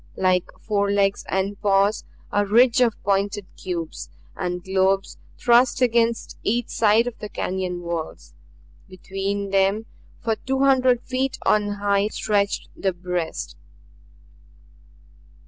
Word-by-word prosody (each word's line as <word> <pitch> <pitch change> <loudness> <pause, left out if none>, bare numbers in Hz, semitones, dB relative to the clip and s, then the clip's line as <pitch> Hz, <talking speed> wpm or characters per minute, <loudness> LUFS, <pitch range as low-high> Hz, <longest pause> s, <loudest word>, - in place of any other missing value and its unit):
Like 185 -1 +2
forelegs 200 -1 +1
and 195 +1 -2
paws, 200 0 +2 0.3
a 205 - +2
ridge 235 +4 +4
of 235 -4 +3
pointed 200 0 0
cubes, 170 -3 -5 0.3
and 180 -1 -3
globes 190 +1 0 0.2
thrust 240 +1 +4
against 235 -2 +1
each 235 +2 -1
side 220 +1 +3
of 245 -2 -6
the 210 - -6
canyon 180 -2 -3
walls. 170 -2 -5 0.6
Between 195 +2 -4
them 195 +3 +2 0.3
for 225 -1 -1
two 265 0 -2
hundred 255 -3 +3
feet 260 +1 -2
on 205 -1 +2
high 200 0 +1
stretched 205 -2 -1
the 190 -1 -1
breast. 175 - -4
200 Hz, 115 wpm, -23 LUFS, 190-230 Hz, 0.6 s, ridge